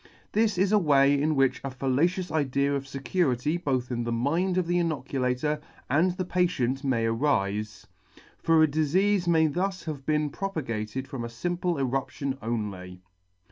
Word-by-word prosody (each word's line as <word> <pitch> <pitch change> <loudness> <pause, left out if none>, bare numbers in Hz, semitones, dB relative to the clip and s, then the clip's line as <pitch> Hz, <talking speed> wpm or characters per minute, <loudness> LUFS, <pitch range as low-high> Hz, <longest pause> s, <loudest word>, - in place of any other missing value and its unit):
This 215 -2 +2
is 195 +2 +2
a 210 - +5
way 140 -5 +4
in 150 +2 +1
which 135 -1 +2
a 135 - -3
fallacious 145 +9 0
idea 140 -2 +1
of 140 -1 -3
fecurity 140 +1 0
both 130 -7 -2
in 120 -1 -1
the 120 - -3
mind 165 +11 0
of 185 - +1
the 175 +1 +1
inoculator 140 -2 -1 0.3
and 160 +7 +4
the 185 0 -3
patient 150 -8 0
may 125 -5 +1
arife; 110 -4 -1 0.6
for 165 -1 +4
a - - +5
difeafe 175 +6 +1
may 160 -2 +4
thus 180 +4 -1
have 150 -4 -5
been 150 0 0
propagated 130 - -4
from 135 -3 -5
a - - -3
limple 175 +7 -2
eruption 135 +1 -2
only. 100 -5 -4
140 Hz, 160 wpm, -27 LUFS, 125-175 Hz, 0.6 s, a